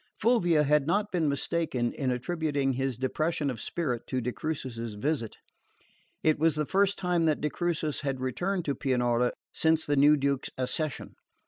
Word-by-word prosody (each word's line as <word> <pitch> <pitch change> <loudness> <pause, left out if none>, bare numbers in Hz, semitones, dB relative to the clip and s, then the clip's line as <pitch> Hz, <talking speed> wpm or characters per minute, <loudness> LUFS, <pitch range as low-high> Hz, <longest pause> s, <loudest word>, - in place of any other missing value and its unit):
Fulvia 175 -10 +3
had 150 0 +2
not 205 +4 +1
been 165 -5 +1
mistaken 140 -4 -1
in 135 -3 -2
attributing 140 +1 0
his 130 -1 -2
depression 145 +2 -1
of 115 -5 -7
spirit 125 -9 -2
to 130 - -1
de 125 0 -2
Crucis's 120 -7 -4
visit. 130 0 -2 0.9
It 155 -1 +3
was 160 0 +3
the 150 0 0
first 200 +4 +2
time 175 -2 +1
that 155 -2 +2
de 150 - -1
Crucis 160 -4 -1
had 135 -3 -2
returned 175 +9 -2
to 140 - 0
Pianura 125 -3 +1 0.2
since 160 0 +2
the 145 - +1
new 145 +2 +6
Duke's 140 -1 -1
accession. 135 +3 -2
150 Hz, 165 wpm, -28 LUFS, 130-165 Hz, 0.9 s, new